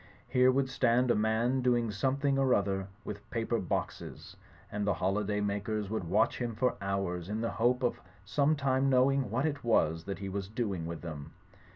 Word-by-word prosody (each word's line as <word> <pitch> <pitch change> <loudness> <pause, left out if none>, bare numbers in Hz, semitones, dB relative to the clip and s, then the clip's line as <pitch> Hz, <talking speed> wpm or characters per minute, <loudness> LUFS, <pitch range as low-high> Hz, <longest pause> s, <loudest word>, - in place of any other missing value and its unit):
Here 125 0 +4
would 135 +1 +1
stand 125 -1 +2
a - - +3
man 110 +5 +1
doing 120 -3 +2
some 130 +7 0
thing 140 -1 +1
or 135 -2 +4
other 95 -1 -1 0.2
with 105 0 -7
paper 115 -1 -1
boxes; 90 - -4 0.4
and 105 0 -2
the 100 - +2
holiday 105 +3 0
makers 105 0 -2
would 110 -5 -2
watch 95 +6 +2
him 120 -3 -2
for 125 +3 +1
hours 95 -3 -2
in 105 +1 -2
the 115 - -1
hope 125 +3 +1
of 120 - 0 0.2
some 145 +8 +2
time 135 -1 +1
knowing 135 -1 +3
what 125 +7 0
it 145 -2 -2
was 80 -8 +2
that 100 - -4
he 100 - -5
was 95 0 -3
doing 100 -7 -3
with 85 -1 -6
them. 75 -4 -7
110 Hz, 195 wpm, -31 LUFS, 100-130 Hz, 0.4 s, Here